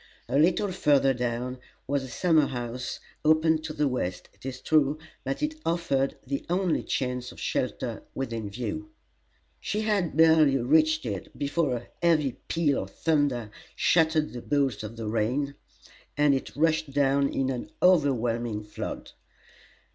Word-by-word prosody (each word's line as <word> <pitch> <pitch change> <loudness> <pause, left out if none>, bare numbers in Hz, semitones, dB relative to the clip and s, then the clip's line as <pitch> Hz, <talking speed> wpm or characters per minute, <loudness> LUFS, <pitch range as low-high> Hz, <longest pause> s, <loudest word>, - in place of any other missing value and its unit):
A 130 +4 +1
little 185 +5 +3
further 140 -6 +3
down 125 +1 -3 0.3
was 140 +1 0
a - - -6
summer 155 +3 +3
house 120 0 -4 0.2
open 155 +1 +4
to 160 0 -5
the 150 -1 +1
west, 95 -9 -3
it - - -10
is 130 -1 -5
true, 150 0 +2 0.3
but 135 - -3
it 310 +1 -2
offered 165 -6 0
the 140 +1 -3
only 180 -1 +1
chance 125 -1 -2
of - - -13
shelter - - -2
within 115 -5 -3
view. 220 - -5 0.7
She 210 - -2
had 200 -8 0
barely 160 -4 +6
reached 155 +4 +3
it 100 -5 -5
before 145 -1 0
a 120 - -7
heavy 160 -5 +3 0.2
peal 155 -5 +1
of - - -7
thunder 145 -9 0 0.2
shattered 160 -2 +2
the 120 - -6
bolts 140 -5 0
of 110 +1 -7
the 115 -1 -6
rain, 120 +6 0 0.6
and 145 -1 +4
it 135 - -3
rushed 155 -1 +1
down 140 0 +3
in 135 0 0
an 125 -2 -5
overwhelming 120 - +2
flood. 105 - -6
140 Hz, 150 wpm, -27 LUFS, 125-160 Hz, 0.7 s, barely